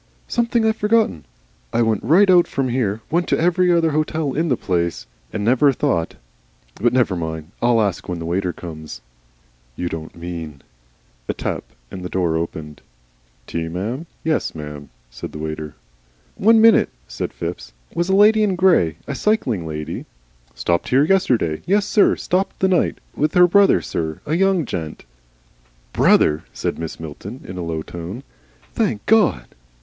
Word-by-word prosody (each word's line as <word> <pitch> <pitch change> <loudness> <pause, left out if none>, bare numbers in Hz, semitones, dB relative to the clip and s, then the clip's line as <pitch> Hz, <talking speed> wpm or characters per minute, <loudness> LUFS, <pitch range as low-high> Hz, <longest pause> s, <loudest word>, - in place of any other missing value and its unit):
"Something 235 -1 +1
I've 220 0 +2
forgotten. 210 - +1 0.5
I 120 - +2
went 110 -3 +1
right 190 +7 +5
out 180 -2 +5
from 135 -2 -1
here, 115 -4 -1
went 170 +2 +1
to - - +1
every 180 +2 +3
other 165 -2 +3
hotel 155 -1 -1
in 165 +3 0
the 125 - +2
place, 85 -2 -1 0.3
and 105 - -3
never 130 +4 +4
thought 85 -9 -1 0.7
But 120 +1 +3
never 125 -6 +2
mind. 80 -1 -5
I'll 120 -1 +3
ask 100 -5 -1
when 90 - -2
the 85 - -6
waiter 90 +2 -1
comes." 80 -3 -9 0.7
"You 90 - -3
don't 80 -1 -7
mean 85 -4 -7 0.3
" - - -37
A - - -1
tap, - - -3 0.3
and 95 - -7
the 90 - -5
door 85 -4 0
opened. 80 -2 -5 0.6
"Tea, 85 0 -3
m'm? 110 - -4 0.2
yes, 160 - -1
m'm," 75 -2 -8 0.2
said - - -8
the - - -6
waiter. 75 -1 -5 0.6
"One 225 +2 +4
minute," 225 0 +6 0.2
said - - -4
Phipps. 85 +1 -6 0.2
"Was 170 +2 -1
a 190 - +3
lady 215 +2 +6
in 200 -3 +2
grey, 170 - +3
a 140 - -4
cycling 130 - 0
lady 75 -1 -5 0.2
" - - -36
"Stopped 85 0 -1
here 135 +3 +4
yesterday? 125 - +1
Yessir. 205 +2 +3
Stopped 185 +2 -1
the 190 - +3
night. 185 -1 +1 0.2
With 150 +5 0
her 180 0 +8
brother, 200 +3 +4
sir 80 -2 -3
a 150 - -2
young 190 -2 +2
gent." 80 - -5 0.9
"Brother!" 75 +1 +4
said - - -3
Mrs. 80 -1 -6
Milton, 90 - -8
in 90 0 -6
a - - -3
low 80 -2 -3
tone. 85 +11 -7 0.5
"Thank 190 - -1
God!" 210 - +3
110 Hz, 165 wpm, -20 LUFS, -, 0.9 s, her